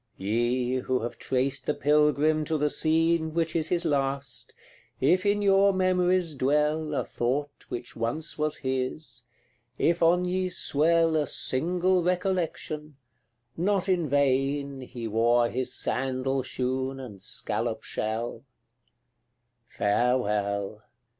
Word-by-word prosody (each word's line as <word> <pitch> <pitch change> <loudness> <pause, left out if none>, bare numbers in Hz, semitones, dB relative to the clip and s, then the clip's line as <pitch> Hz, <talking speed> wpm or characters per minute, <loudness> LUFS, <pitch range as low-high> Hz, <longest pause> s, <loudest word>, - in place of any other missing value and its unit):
Ye, 120 +5 0
who 130 0 -1
have 120 - -5
traced 135 +1 -1
the 150 - +1
Pilgrim 150 +1 +3
to 160 +1 0
the 150 0 +1
scene 160 0 +1
Which 165 -1 0
is 160 -1 +1
his 175 -1 +1
last, 140 -3 -2 0.4
if 185 +9 +3
in 205 0 +2
your 195 0 +5
memories 185 -2 +2
dwell 150 +3 +1
A - - 0
thought 140 +4 -3
which 120 0 -6
once 120 +8 -3
was 150 0 -1
his, 130 0 -3 0.5
if 170 +1 +1
on 175 +2 +4
ye 185 +1 -1
swell 165 0 +2
A 150 -2 +1
single 180 +9 +1
recollection, 170 -5 -2 0.6
not 195 +2 0
in 175 -5 +1
vain 140 0 +1
He 125 -2 -6
wore 115 +2 +2
his 130 +1 -2
sandal 135 +1 -1
shoon 130 +1 -3
and 105 -7 -9
scallop - - -3
shell; 110 +4 -3 1.2
Farewell! 105 -3 0
145 Hz, 120 wpm, -27 LUFS, 130-165 Hz, 1.2 s, your